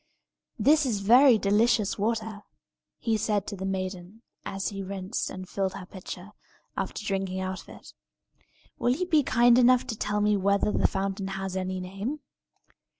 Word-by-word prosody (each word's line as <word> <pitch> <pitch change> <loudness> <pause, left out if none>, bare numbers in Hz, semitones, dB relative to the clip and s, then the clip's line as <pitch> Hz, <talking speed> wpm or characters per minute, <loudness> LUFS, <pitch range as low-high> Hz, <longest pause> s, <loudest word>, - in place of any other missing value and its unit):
"This 285 +6 +4
is 210 -5 -1
very 245 +4 +7
delicious 210 0 +2
water," 220 -1 -2 0.6
he 225 -2 0
said 210 -2 0
to - - -5
the 190 0 -4
maiden 185 +2 -5 0.2
as 195 0 -3
he 195 -1 -6
rinsed 190 -1 -4
and 185 0 -8
filled 190 -1 -2
her 195 -2 -7
pitcher, 185 +1 -9 0.4
after 210 - -4
drinking 190 -2 -2
out 185 -1 -4
of - - -18
it. - - -13 0.9
"Will 245 +1 +2
you 365 - -2
be 320 -4 +3
kind 240 -2 +4
enough 255 +1 +5
to 245 -3 -4
tell 210 0 -1
me 210 0 +3
whether 200 +2 +2
the - - +2
fountain 195 0 -3
has 195 -1 -4
any 185 0 -2
name?" 195 +11 -5
200 Hz, 165 wpm, -27 LUFS, 190-230 Hz, 0.9 s, very